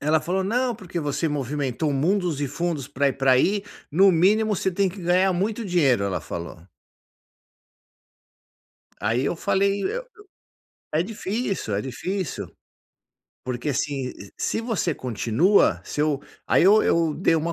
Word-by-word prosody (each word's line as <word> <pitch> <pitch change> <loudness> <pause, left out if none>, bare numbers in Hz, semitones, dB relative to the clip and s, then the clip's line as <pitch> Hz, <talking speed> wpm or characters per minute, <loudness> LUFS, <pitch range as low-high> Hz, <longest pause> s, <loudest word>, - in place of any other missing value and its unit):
Ela 155 +2 +2
falou: 190 +2 -1
"Não, 245 +4 0
porque 180 -3 -5
você 150 +2 -1
movimentou 145 0 -2
mundos 170 +2 0
e 145 - 0
fundos 155 -1 -2
pra 140 0 +1
ir 135 - -2
pra 135 -1 +3
aí, 195 +11 +3 0.3
no 190 +6 +6
mínimo 210 +6 +3
você 190 - 0
tem 195 +2 +1
que 190 +2 -9
ganhar 180 +2 +3
muito 210 +5 -1
dinheiro", 145 - +2
ela 100 -2 -2
falou. 85 -1 -7 2.4
Aí 115 +5 0
eu 170 - -1
falei, 200 +3 +1
eu - - -2 0.9
eu 155 - +1
é - - +2
difícil, 200 - -3
é 100 - -1
difícil. 180 - -4 1.0
Porque, 125 +3 -3
assim, 140 -1 -1
e, 100 - -12
se - - -1
você 220 -8 -1
continua, 125 - +2
se - - -4
eu 150 -2 +1 0.3
aí - - +4
eu 205 +4 +6
eu 165 -2 +2
dei 165 0 +2
uma 165 +2 -1
165 Hz, 155 wpm, -24 LUFS, 135-195 Hz, 2.4 s, no